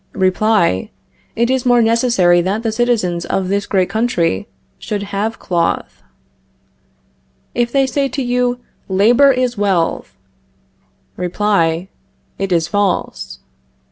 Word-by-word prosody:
Reply: 185 - +1 0.5
It 235 +2 +1
is 260 -1 0
more 245 -1 +4
necessary 225 -7 +3
that 200 +5 -2
the 225 - 0
citizens 215 -7 0
of 185 +1 -2
this 200 +1 -1
great 185 -2 +1
country 185 - -1 0.3
should 205 -1 -4
have 215 +3 -2
cloth. 170 -2 -2 1.5
If 240 0 0
they 275 0 +3
say 275 +1 -1
to 270 +1 -3
you: 245 0 0 0.3
Labor 230 +9 +5
is 250 -3 -1
wealth 190 -5 -1 1.0
Reply: 180 -2 0 0.5
It 195 -1 -2
is 165 -2 +2
false. 65 - -2
205 Hz, 115 wpm, -17 LUFS, 180-240 Hz, 1.5 s, Labor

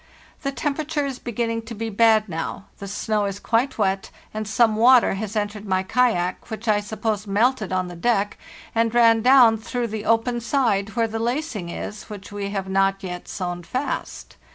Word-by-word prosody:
The 275 - -2
temperature 295 +1 -2
is 270 -2 -4
beginning 230 -1 -2
to 230 - -6
be 225 +1 -4
bad 220 0 +4
now; 165 +2 -5
the 200 - -6
snow 210 +1 -1
is 200 0 -4
quite 235 +6 0
wet, 195 -2 0 0.2
and 215 -1 -4
some 220 0 +3
water 245 +2 +6
has 205 +2 -5
entered 205 0 -2
my 185 -1 +1
kayak, 190 -4 0
which 220 +1 -6
I 210 -1 +4
suppose 210 0 -3
melted 215 +1 +1
on 185 -1 0
the 175 - -8
deck 205 +2 0 0.3
and 230 0 +1
ran 230 -1 +5
down 245 -3 +6
through 235 +1 -3
the 215 0 -5
open 230 +2 +2
side 220 -4 0
where 230 -1 +2
the 225 0 -4
lacing 235 - -2
is, 210 +4 -6
which 205 -2 -9
we 200 -1 -4
have 195 -1 -3
not 195 +1 +1
yet 180 -1 -6
sewn 175 -2 -4
fast. 255 +11 -4
220 Hz, 185 wpm, -23 LUFS, 200-235 Hz, 0.3 s, water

